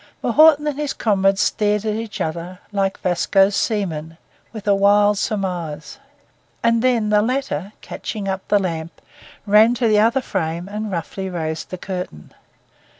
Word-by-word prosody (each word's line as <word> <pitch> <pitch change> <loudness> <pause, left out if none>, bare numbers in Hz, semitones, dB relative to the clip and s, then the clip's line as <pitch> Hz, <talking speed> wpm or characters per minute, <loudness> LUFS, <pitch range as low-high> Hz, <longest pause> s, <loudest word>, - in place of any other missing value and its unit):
M'Naughten 300 +4 +5
and 295 -1 -2
his 295 -2 -2
comrade 195 -3 +2
stared 210 +1 +1
at 215 - 0
each 215 -2 -5
other 170 +2 -4
like 195 -1 -1
Vasco's 195 +2 +2
seamen, 165 -7 -2 0.3
'with 215 -3 -9
a 200 - +5
wild 205 +1 +4
surmise'; 175 - -3 0.6
and 230 0 +3
then 235 -4 +2
the 210 0 +4
latter, 250 -4 -2
catching 205 -3 -6
up 190 0 -2
the 205 - +3
lamp, 165 -4 -4 0.5
ran 215 +3 +5
to 240 -1 +1
the 215 -1 +4
other 230 +5 +3
frame 170 -5 -3
and 210 +1 -5
roughly 190 +2 -4
raised 160 -3 -4
the 185 - -6
curtain. 180 - -6
200 Hz, 150 wpm, -20 LUFS, 180-220 Hz, 0.6 s, M'Naughten